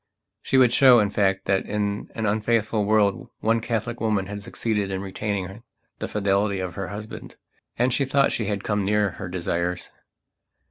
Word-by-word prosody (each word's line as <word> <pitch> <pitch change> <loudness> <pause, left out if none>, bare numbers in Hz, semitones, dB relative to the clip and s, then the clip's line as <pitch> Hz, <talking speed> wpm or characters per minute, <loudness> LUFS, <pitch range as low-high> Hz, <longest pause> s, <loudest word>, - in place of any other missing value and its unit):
She 135 - +1
would 125 -2 +5
show, 130 -3 +7
in 105 -2 +1
fact, 95 -2 +1
that 95 -1 +1
in 105 -1 -2
an 110 - -2
unfaithful 110 0 +1
world 105 -2 +2
one 115 +1 +2
Catholic 115 +1 -3
woman 105 -4 +1
had 100 +1 -6
succeeded 105 -1 -2
in 95 -1 -2
retaining 100 +1 -4 0.4
the - - -3
fidelity 100 -1 0
of 95 -1 -4
her 95 0 -4
husband. 105 +4 -8 0.4
And 125 +1 +2
she 140 - +1
thought 135 +1 +2
she 110 - -2
had 100 -1 -2
come 105 -1 0
near 105 0 +1
her 95 - -7
desires. 90 0 -2
105 Hz, 175 wpm, -24 LUFS, 95-110 Hz, 0.4 s, show